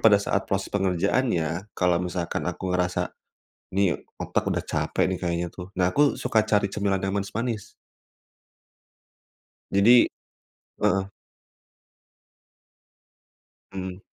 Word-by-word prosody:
pada 105 -2 +7
saat 100 -1 -1
proses 95 0 -1
pengerjaannya 95 - 0
kalau 90 -1 +2
misalkan 90 -1 -3
aku 90 +1 -3
ngerasa, 90 0 0 0.7
"Nih, 100 -3 +2 0.2
otak - - -1
udah - - 0
capek - - 0
nih 95 - -2
kayaknya," 85 -1 -1
tuh. 90 0 -8
Nah, 90 -1 +3
aku 145 0 +4
suka 110 -1 +2
cari 105 -1 +3
cemilan 100 -2 0
yang 95 +1 -1
manis-manis. 110 +2 -3 2.0
Jadi 115 +5 +6 0.7
heeh. 95 +1 +1 2.6
Mhm. 95 -1 -5
95 Hz, 105 wpm, -25 LUFS, 90-100 Hz, 2.6 s, pada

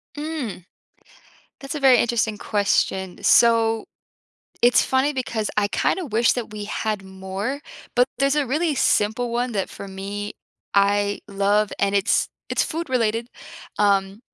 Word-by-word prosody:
Mm, 290 - -5 1.0
that's 275 +3 -6
a 300 - -3
very 265 -3 +6
interesting 225 -3 0
question, 190 -3 0
so 225 -1 +4 0.8
it's 245 0 +6
funny 265 +3 +1
because 235 -5 -2
I 205 -1 +2
kinda 365 - 0
wish 230 0 +3
that 240 -4 -4
we 210 -1 -6
had 215 -1 -3
more, 190 +8 -5 0.3
but 245 +1 +4
there's 275 +1 +2
a 295 -2 +1
really 305 +4 0
simple 230 +1 +1
one 240 +1 -1
that 195 -3 -1
for - - -8
me, 200 +2 -5 0.4
I 200 0 +2
love, 200 +1 +1
and 200 0 +1
it's 200 +1 +2 0.2
it's - - +1
food 330 0 -4
related, 230 -1 0 0.5
um, 200 0 +2
220 Hz, 140 wpm, -23 LUFS, 200-255 Hz, 1.0 s, very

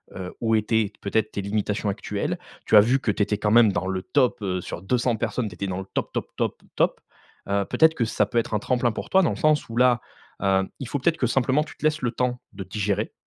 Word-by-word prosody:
heu, 90 -1 -6
où 115 -1 +2
étaient 110 -1 +1
peut-être 105 +1 0
tes 100 - -2
limitations 105 +1 -1
actuelles. 100 0 -3 0.3
Tu - - +3
as - - +10
vu 125 +6 +2
que 115 - 0
tu 105 - +1
étais 105 +1 -1
quand 105 0 0
même 115 -2 +6
dans 95 - -1
le 95 -1 -2
top, 125 -1 +1
heu, 95 -2 -2
sur 85 - -7
200 120 +4 +1
personnes. 115 +2 -2
Tu - - -12
étais 100 - -4
dans 95 -1 -3
le 95 - -6
top, - - -2
top, - - -2
top, - - -2
top. - - +1 0.5
Heu, 100 0 +2
peut-être 160 +7 +4
que 125 - 0
ça 105 -1 +1
peut 110 - -4
être 115 0 0
un 105 - +2
tremplin 125 +1 +1
pour - - -6
toi 190 - +5
dans 170 - +2
le - - -2
sens 155 -5 +2
où 115 - -6
là, 125 -1 +4 0.4
hem, 95 0 +2
il 135 - -5
faut 145 - -2
peut-être 160 +5 +2
que 125 - +1
simplement 135 +4 +2
tu 150 - -13
te - - -5
laisses 155 0 +2
le 120 -2 0
temps 125 0 -1
de 95 -1 -6
digérer 100 +1 -2
110 Hz, 260 wpm, -24 LUFS, 100-125 Hz, 0.5 s, as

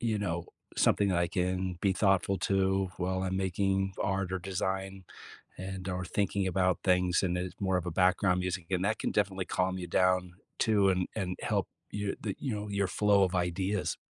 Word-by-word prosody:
you 115 -3 0
know, 85 -4 -2 0.3
something 100 - +3
that 90 -2 +2
I 85 - +2
can 90 -1 -1
be 100 - +3
thoughtful 95 0 +2
to 95 0 +1
while 95 +1 -1
I'm 95 0 -1
making 95 0 0
art 95 -1 -1
or 95 - 0
design 95 +1 -3 0.5
and, 95 0 -5
or 90 0 -2
thinking 100 +1 0
about 90 -1 +2
things 90 -1 +3
and 90 -1 0
it's 90 0 -4
more 95 -2 +1
of 90 -1 -2
a - - -1
background 90 +1 +3
music, 90 -1 -3
and 95 0 0
that 110 +2 +1
can - - -1
definitely 95 -2 0
calm 95 0 0
you 90 - -5
down 90 0 +2 0.2
too 105 -3 +3
and 90 -1 0
and 90 -1 -2
help - - 0 0.2
you 105 -1 -3
the 100 -3 -3
you 130 -6 -2
know, 105 0 -4
your 100 -1 0
flow 100 +1 +3
of 90 - -2
ideas. 95 +3 -1
95 Hz, 195 wpm, -30 LUFS, 90-100 Hz, 0.5 s, something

